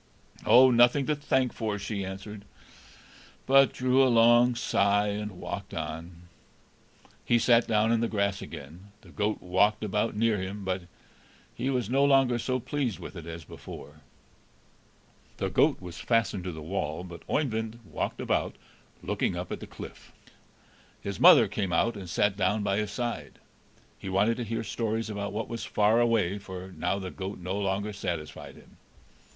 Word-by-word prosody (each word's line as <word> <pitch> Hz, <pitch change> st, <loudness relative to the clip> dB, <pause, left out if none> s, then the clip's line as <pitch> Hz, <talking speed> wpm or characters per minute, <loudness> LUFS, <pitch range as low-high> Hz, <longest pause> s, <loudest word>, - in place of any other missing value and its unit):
"Oh, 130 Hz, +1 st, +8 dB
nothing 120 Hz, +3 st, +5 dB
to 150 Hz, -, +1 dB
thank 130 Hz, -3 st, 0 dB
for!" 110 Hz, -3 st, -2 dB
she 100 Hz, 0 st, -4 dB
answered, 95 Hz, +2 st, -7 dB, 1.0 s
but 135 Hz, 0 st, +6 dB
drew 130 Hz, +1 st, +2 dB
a 130 Hz, -, +4 dB
long 120 Hz, +1 st, +5 dB
sigh, 105 Hz, -3 st, +2 dB
and 105 Hz, 0 st, -4 dB
walked 100 Hz, 0 st, -6 dB
on. 80 Hz, +2 st, -6 dB, 1.0 s
He 120 Hz, -, +3 dB
sat 115 Hz, 0 st, +4 dB
down 110 Hz, 0 st, +2 dB
on 115 Hz, -, +3 dB
the 115 Hz, -, +1 dB
grass 100 Hz, -2 st, -1 dB
again. 85 Hz, +8 st, -10 dB
The -, -, -16 dB
goat 105 Hz, +1 st, -2 dB
walked 100 Hz, +4 st, +2 dB
about 105 Hz, +2 st, -1 dB
near 110 Hz, -1 st, +2 dB
him, 95 Hz, +2 st, -6 dB
but 95 Hz, -1 st, -2 dB, 0.7 s
he 130 Hz, -, -2 dB
was 125 Hz, -5 st, 0 dB
no 135 Hz, +4 st, +2 dB
longer 135 Hz, -4 st, +4 dB
so 130 Hz, +2 st, -1 dB
pleased 130 Hz, -3 st, -2 dB
with -, -, -9 dB
it 85 Hz, -2 st, -8 dB
as 85 Hz, 0 st, -7 dB
before. 75 Hz, 0 st, -11 dB, 1.4 s
The -, -, -2 dB
goat -, -, +3 dB
was 90 Hz, -3 st, -9 dB
fastened 115 Hz, -5 st, 0 dB
to 90 Hz, -, -3 dB
the 80 Hz, -2 st, -8 dB
wall; 85 Hz, -1 st, -3 dB
but 85 Hz, -2 st, -10 dB
Oeyvind 115 Hz, -5 st, -1 dB
walked -, -, -4 dB
about, -, -, -1 dB, 0.5 s
looking -, -, -1 dB
up -, -, -5 dB
at -, -, -4 dB
the -, -, -9 dB
cliff. -, -, -11 dB, 0.9 s
His 100 Hz, -2 st, -5 dB
mother -, -, +8 dB
came 100 Hz, -4 st, -2 dB
out 115 Hz, +7 st, +2 dB
and 95 Hz, -4 st, -8 dB
sat 105 Hz, +1 st, +1 dB
down 105 Hz, +2 st, +1 dB
by 100 Hz, -1 st, 0 dB
his 105 Hz, -1 st, -1 dB
side; 120 Hz, +3 st, -4 dB, 0.6 s
he 95 Hz, -, -6 dB
wanted 105 Hz, +5 st, +2 dB
to 120 Hz, -, -3 dB
hear 115 Hz, +1 st, -3 dB
stories 110 Hz, 0 st, -2 dB
about 100 Hz, -1 st, -4 dB
what 110 Hz, +2 st, -3 dB
was 115 Hz, -1 st, -5 dB
far 105 Hz, +2 st, +2 dB
away, 110 Hz, -5 st, +2 dB
for 95 Hz, -1 st, -8 dB
now 90 Hz, +2 st, -1 dB
the 95 Hz, -2 st, -5 dB
goat 95 Hz, +1 st, -6 dB
no 90 Hz, +1 st, -4 dB
longer 100 Hz, +1 st, -1 dB
satisfied 85 Hz, -6 st, -5 dB
him. -, -, -18 dB
105 Hz, 170 wpm, -28 LUFS, 95-115 Hz, 1.4 s, Oh